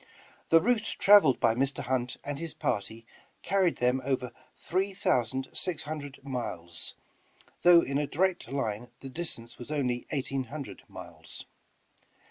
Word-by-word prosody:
The 165 Hz, -, +8 dB
route 225 Hz, +4 st, +1 dB
traveled 195 Hz, -10 st, +7 dB
by 115 Hz, -, +4 dB
Mr. 135 Hz, +4 st, 0 dB
Hunt 125 Hz, -1 st, -1 dB
and 145 Hz, 0 st, -4 dB
his 165 Hz, -2 st, -5 dB
party 110 Hz, +1 st, -2 dB, 0.4 s
carried 190 Hz, -3 st, +2 dB
them 125 Hz, +2 st, +1 dB
over 125 Hz, -2 st, -1 dB, 0.3 s
three 190 Hz, +2 st, -1 dB
thousand 130 Hz, -, +1 dB
six 180 Hz, -3 st, -2 dB
hundred 145 Hz, -3 st, -6 dB
miles, 85 Hz, -, -4 dB, 0.7 s
though 175 Hz, -1 st, +8 dB
in 140 Hz, +1 st, -1 dB
a 145 Hz, -, 0 dB
direct 185 Hz, +4 st, 0 dB
line 120 Hz, -4 st, -2 dB
the 135 Hz, -, -7 dB
distance 130 Hz, -7 st, -5 dB
was 120 Hz, -, -8 dB
only 125 Hz, -5 st, -1 dB
eighteen 135 Hz, -2 st, -2 dB
hundred 140 Hz, +3 st, -7 dB
miles. -, -, -8 dB
135 Hz, 140 wpm, -29 LUFS, 125-165 Hz, 0.7 s, The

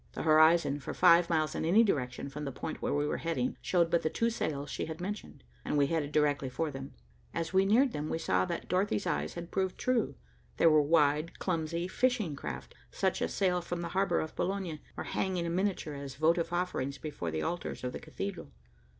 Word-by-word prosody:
The -, -, -4 dB
horizon, 155 Hz, -2 st, +5 dB
for -, -, -6 dB
five 170 Hz, 0 st, +6 dB
miles 155 Hz, -2 st, +1 dB
in -, -, -2 dB
any 190 Hz, +8 st, +5 dB
direction 130 Hz, -, -1 dB
from 150 Hz, +2 st, -6 dB
the 140 Hz, -, -3 dB
point -, -, -6 dB
where -, -, -1 dB
we 145 Hz, 0 st, +1 dB
were 150 Hz, -, -1 dB
heading, 170 Hz, +10 st, -1 dB
showed 170 Hz, -2 st, +2 dB
but 170 Hz, -, +3 dB
the 155 Hz, -, 0 dB
two 230 Hz, +6 st, 0 dB
sails 145 Hz, -10 st, -3 dB
she -, -, -3 dB
had 160 Hz, +1 st, -6 dB
mentioned, 200 Hz, -, -6 dB, 0.2 s
and -, -, -1 dB
we 140 Hz, -, +5 dB
headed 150 Hz, -1 st, -1 dB
directly 145 Hz, -3 st, +1 dB
for 155 Hz, +4 st, -2 dB
them. 135 Hz, 0 st, -8 dB, 0.4 s
As 165 Hz, +1 st, -2 dB
we 190 Hz, +1 st, +4 dB
neared 250 Hz, +6 st, +4 dB
them, 150 Hz, -4 st, -4 dB
we -, -, -1 dB
saw 95 Hz, -, +1 dB
that -, -, -4 dB
Dorothy's 195 Hz, +2 st, 0 dB
eyes -, -, -1 dB
had 170 Hz, 0 st, -7 dB
proved 190 Hz, -1 st, -1 dB
true. 255 Hz, -3 st, 0 dB, 0.4 s
They -, -, +3 dB
were 155 Hz, -2 st, +7 dB
wide, 150 Hz, +1 st, +2 dB
clumsy, 170 Hz, -1 st, -1 dB
fishing 215 Hz, -, 0 dB
craft, 70 Hz, -, -6 dB, 0.2 s
such -, -, -1 dB
as -, -, 0 dB
sail 180 Hz, -2 st, +1 dB
from 175 Hz, 0 st, -4 dB
the 170 Hz, -, -3 dB
harbor 195 Hz, +2 st, +1 dB
of 160 Hz, -, -6 dB
Boulogne, 185 Hz, -5 st, -2 dB, 0.2 s
or -, -, -3 dB
hang 190 Hz, -1 st, -1 dB
in 170 Hz, -1 st, -1 dB
miniature 190 Hz, -5 st, -1 dB
as 140 Hz, -2 st, -7 dB
votive 165 Hz, +4 st, +2 dB
offerings 175 Hz, -6 st, -1 dB
before 145 Hz, -, -5 dB
the 80 Hz, 0 st, -2 dB
altars 175 Hz, -5 st, -3 dB
of 125 Hz, -, -3 dB
the -, -, -5 dB
cathedral. 195 Hz, -, -6 dB
165 Hz, 215 wpm, -31 LUFS, 145-185 Hz, 0.4 s, were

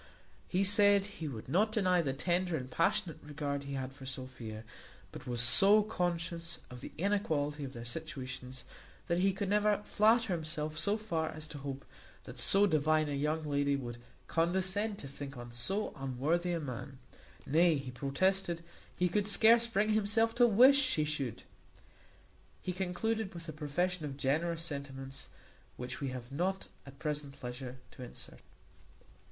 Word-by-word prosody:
He 190 Hz, +2 st, +1 dB
said 205 Hz, 0 st, +5 dB
he 195 Hz, -6 st, -6 dB
would 115 Hz, -6 st, -6 dB
not 200 Hz, -, +2 dB
deny 185 Hz, -5 st, +3 dB
the 140 Hz, -5 st, -1 dB
tender 175 Hz, +4 st, 0 dB
and 130 Hz, -2 st, -7 dB
passionate 165 Hz, +1 st, +1 dB
regard 145 Hz, -1 st, -4 dB
he 140 Hz, -, -5 dB
had 130 Hz, 0 st, -4 dB
for 135 Hz, -1 st, -10 dB
Sophia; 130 Hz, -5 st, -7 dB, 0.5 s
but -, -, -10 dB
was 120 Hz, -2 st, 0 dB
so 200 Hz, -, +6 dB
conscious 170 Hz, -4 st, -2 dB
of 125 Hz, -1 st, -9 dB
the -, -, -7 dB
inequality 155 Hz, -7 st, 0 dB
of 135 Hz, -1 st, -6 dB
their 120 Hz, 0 st, -7 dB
situations, 130 Hz, -1 st, -5 dB, 0.4 s
that 170 Hz, +1 st, +1 dB
he 195 Hz, +2 st, +4 dB
could 195 Hz, +1 st, -3 dB
never 210 Hz, 0 st, +3 dB
flatter 220 Hz, -1 st, +3 dB
himself 155 Hz, -2 st, -3 dB
so 205 Hz, +1 st, +1 dB
far 165 Hz, -8 st, -2 dB
as 155 Hz, 0 st, -6 dB
to 145 Hz, -, -7 dB
hope 135 Hz, 0 st, -6 dB, 0.4 s
that -, -, -9 dB
so 200 Hz, +1 st, +4 dB
divine 155 Hz, -3 st, +2 dB
a -, -, -2 dB
young 150 Hz, +3 st, 0 dB
lady 140 Hz, -1 st, +1 dB
would 120 Hz, -3 st, -5 dB, 0.3 s
condescend 190 Hz, +5 st, +1 dB
to 140 Hz, -, -8 dB
think 140 Hz, 0 st, -7 dB
on 120 Hz, 0 st, -8 dB
so 130 Hz, -, 0 dB
unworthy 145 Hz, +6 st, 0 dB
a 170 Hz, -, 0 dB
man; 135 Hz, -2 st, -6 dB, 0.5 s
nay, 165 Hz, +3 st, +4 dB
he 135 Hz, -2 st, -5 dB
protested, 170 Hz, +7 st, 0 dB, 0.3 s
he 180 Hz, -, +3 dB
could 205 Hz, +3 st, 0 dB
scarce 230 Hz, +3 st, +6 dB
bring 215 Hz, -2 st, +1 dB
himself 215 Hz, +1 st, +3 dB
to 240 Hz, 0 st, +5 dB
wish 255 Hz, +6 st, +7 dB
she 255 Hz, -, +1 dB
should. 140 Hz, -6 st, -3 dB, 1.2 s
He 180 Hz, -, -2 dB
concluded 190 Hz, +3 st, -2 dB
with 170 Hz, 0 st, -7 dB
a 155 Hz, -, -5 dB
profession 165 Hz, +4 st, -1 dB
of 135 Hz, -2 st, -5 dB
generous 160 Hz, +5 st, 0 dB
sentiments, 135 Hz, -3 st, -5 dB, 0.5 s
which 125 Hz, +3 st, -6 dB
we 140 Hz, -, -1 dB
have 125 Hz, -1 st, -6 dB
not 185 Hz, +7 st, -1 dB, 0.2 s
at 135 Hz, 0 st, -11 dB
present 145 Hz, -2 st, -4 dB
leisure 125 Hz, +1 st, -6 dB
to -, -, -12 dB
insert. 125 Hz, -, -10 dB
160 Hz, 165 wpm, -33 LUFS, 135-195 Hz, 1.2 s, wish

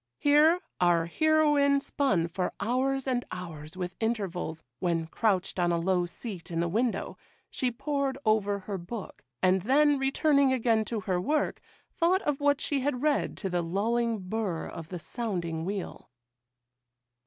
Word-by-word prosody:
Here 300 Hz, +4 st, +5 dB, 0.2 s
our 175 Hz, -2 st, +3 dB
heroine 295 Hz, -, +3 dB
spun 205 Hz, -12 st, 0 dB
for 180 Hz, +2 st, -2 dB
hours, 260 Hz, +5 st, 0 dB
and 245 Hz, -2 st, 0 dB
hours 165 Hz, -3 st, -7 dB
with 180 Hz, -1 st, -4 dB
intervals, 190 Hz, -8 st, -2 dB, 0.2 s
when, 170 Hz, -3 st, 0 dB
crouched 190 Hz, +1 st, 0 dB
on 175 Hz, -1 st, +2 dB
a 170 Hz, -, +2 dB
low 180 Hz, +1 st, +1 dB
seat 190 Hz, 0 st, -8 dB
in 165 Hz, -1 st, -2 dB
the 170 Hz, -, +1 dB
window, 225 Hz, +7 st, -1 dB, 0.3 s
she 255 Hz, -, 0 dB
pored 275 Hz, +2 st, -2 dB
over 205 Hz, -2 st, +2 dB
her 195 Hz, 0 st, -4 dB
book, 195 Hz, +5 st, -8 dB, 0.2 s
and 185 Hz, 0 st, +4 dB
then, 285 Hz, +6 st, +4 dB
returning 275 Hz, 0 st, +3 dB
again 230 Hz, -3 st, +2 dB
to 225 Hz, -2 st, -3 dB
her 185 Hz, -3 st, -1 dB
work, 300 Hz, +10 st, 0 dB, 0.3 s
thought 365 Hz, +4 st, +2 dB
of 295 Hz, -2 st, 0 dB
what 285 Hz, -1 st, +3 dB
she 285 Hz, -, 0 dB
had 260 Hz, -1 st, -1 dB
read 300 Hz, -2 st, +1 dB
to 195 Hz, -, -3 dB
the 175 Hz, -1 st, +1 dB
lulling 225 Hz, +7 st, 0 dB
burr 195 Hz, -5 st, -2 dB
of 165 Hz, -1 st, -8 dB
the 180 Hz, -, -5 dB
sounding 170 Hz, -5 st, -3 dB
wheel. 195 Hz, 0 st, -5 dB
220 Hz, 155 wpm, -29 LUFS, 180-270 Hz, 0.3 s, Here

